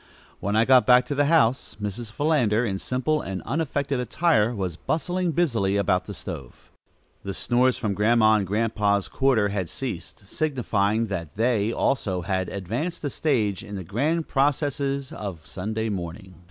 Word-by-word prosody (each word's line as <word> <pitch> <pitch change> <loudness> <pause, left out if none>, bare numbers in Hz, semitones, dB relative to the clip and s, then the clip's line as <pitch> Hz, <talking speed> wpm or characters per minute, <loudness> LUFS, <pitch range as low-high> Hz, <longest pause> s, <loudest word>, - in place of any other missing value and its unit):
When 100 +1 -1
I 110 +1 +4
got 130 0 +5
back 125 0 +6
to 145 - -3
the 145 +1 +2
house, 140 -5 +2
Mrs. 105 +2 -5
Philander, 125 -4 +2
in 95 -3 -2
simple 130 +7 0
and 95 -1 -5
unaffected 140 -3 -1
attire, 125 -2 +2
was 95 -5 -3
bustling 175 - -1
busily 115 - +1
about 90 -2 +1
the 100 - -7
stove. 80 -9 -9 0.5
The 100 -1 -5
snores 125 +1 +2
from 105 -3 -1
Grandma 110 +2 +4
and 105 -3 +1
Grandpa's 105 -1 +1
quarter 125 -7 +2
had 95 -4 -2
ceased, - - -6
signifying 115 -7 0
that 85 -8 -5
they, 115 -1 +1
also, 105 -8 0
had 95 +1 -1
advanced 120 - -4
a 145 - -2
stage 110 - 0
in 105 -2 -7
the 95 - -5
grand 150 - -1
processes 140 -1 0
of 90 -7 -6
Sunday 110 +4 -3
morning. 95 -1 -5
110 Hz, 160 wpm, -25 LUFS, 100-135 Hz, 0.5 s, back